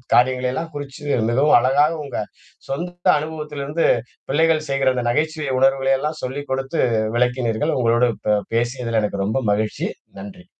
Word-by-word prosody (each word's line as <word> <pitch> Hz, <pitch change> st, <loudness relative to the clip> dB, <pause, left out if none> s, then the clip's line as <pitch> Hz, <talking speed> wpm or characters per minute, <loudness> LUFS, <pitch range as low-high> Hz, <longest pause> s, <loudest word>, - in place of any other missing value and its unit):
காரியங்களெல்லாம் 130 Hz, +5 st, +1 dB
குறிச்சு 145 Hz, 0 st, -7 dB, 0.3 s
மிகவும் 135 Hz, +4 st, +5 dB
அழகா 135 Hz, +4 st, +4 dB, 0.2 s
உங்க 140 Hz, -, -6 dB, 0.5 s
சொந்த 175 Hz, +5 st, -2 dB
அனுபவத்திலிருந்து 150 Hz, 0 st, -3 dB, 0.5 s
பிள்ளைகள் 155 Hz, 0 st, +2 dB
செய்கிற 135 Hz, -1 st, +2 dB
அந்த 125 Hz, -1 st, -2 dB
நகைச்சுவை 155 Hz, +1 st, -1 dB
உணர்வுகலையெல்லாம் 135 Hz, +3 st, +2 dB
சொல்லிக் 140 Hz, +3 st, -5 dB
கொடுத்து 135 Hz, +4 st, -2 dB, 0.4 s
விளக்கினீர்கள். 125 Hz, +2 st, 0 dB
உங்களோடு 120 Hz, +1 st, +3 dB, 0.2 s
ப 105 Hz, -1 st, +4 dB, 0.2 s
பேசியதில 120 Hz, -1 st, 0 dB
எனக்கு 100 Hz, -1 st, -1 dB
ரொம்ப 105 Hz, -, -1 dB, 0.2 s
மகிழ்ச்சி. 110 Hz, -, -2 dB, 0.3 s
நன்றி. 185 Hz, -3 st, -10 dB
135 Hz, 125 wpm, -21 LUFS, 125-155 Hz, 0.5 s, மிகவும்